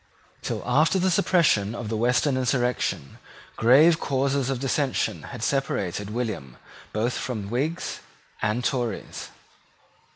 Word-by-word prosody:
Till - - -3
after 155 +9 +3
the 185 0 +2
suppression 165 - +3
of 120 - -5
the 110 - -1
Western 125 +4 +2
insurrection 125 - -1 0.4
grave 150 +8 +5
causes 135 0 0
of 135 -2 -1
dissension 135 +1 0
had - - -7
separated 105 -8 -1
William 105 - -4 0.3
both 115 +3 0
from 110 -5 -4
Whigs 145 +8 -2 0.4
and 110 +3 0
Tories. 120 -6 -3
125 Hz, 120 wpm, -25 LUFS, 110-140 Hz, 0.4 s, grave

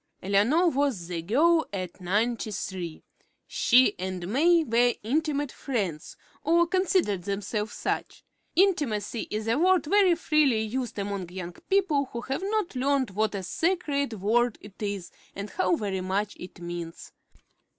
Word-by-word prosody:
Eleanor 210 - +3
was 275 - 0
the 170 -2 -3
girl 315 - +3
at 185 -2 -5
Ninety 215 +5 0
three. 180 -5 -5 0.4
She 255 +2 +4
and 185 -1 -4
May 330 +8 +4
were 240 -2 +3
intimate 290 +3 0
friends, 195 - -4 0.3
or 340 +2 +4
considered 345 - +1
themselves 205 +2 -3
such. - - -3 0.3
Intimacy 270 - +1
is 215 +1 -3
a 230 +5 +2
word 370 -1 +4
very 380 +1 +4
freely 305 -8 +2
used 230 +1 -3
among 200 -3 -3
young 180 -1 -6 0.2
people 370 -8 +2
who 235 -2 -6
have 270 +6 -3
not 405 -5 -1
learned 265 -3 +1
what 215 +2 0
a 195 - -3
sacred 285 - 0
word 225 +3 +1
it 205 0 -14
is 200 -4 -3 0.2
and 200 +1 -6
how 370 -2 +1
very 195 - -3
much 195 +3 -1
it 180 - -10
means. 175 -1 -7
230 Hz, 145 wpm, -27 LUFS, 195-305 Hz, 0.4 s, She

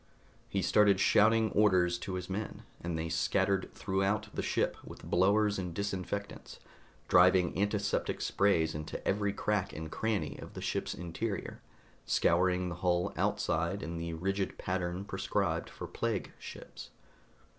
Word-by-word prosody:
He 95 -1 -1
started 100 +2 +4
shouting 110 +2 +4
orders 90 -4 +3
to 95 - -4
his 90 -1 -4
men, 100 +3 -4 0.2
and 85 -1 -2
they 80 +1 -2
scattered 90 +4 +1
throughout 100 +2 0
the - - -2
ship, - - 0
with - - -11
blowers 100 +3 +3
and 90 -2 -4
disinfectants, 100 +1 -4 0.5
driving 90 0 +5
antiseptic 100 +2 0
sprays 85 -6 +2
into 75 0 -6
every 100 +1 +1
crack 105 -1 -1
and 80 0 -6
cranny 105 -8 -1
of - - -10
the - - -5
ship's - - -2
interior, 90 +5 -4 0.4
scouring 90 +1 +2
the 85 - -5
hull 90 -1 +1
outside 85 +5 0
in 85 +1 -4
the 85 0 -4
rigid 95 +3 -2
pattern 90 0 -2
prescribed 95 -3 -1
for - - -7
plague - - -2
ships. - - -10
95 Hz, 140 wpm, -32 LUFS, 85-100 Hz, 0.5 s, driving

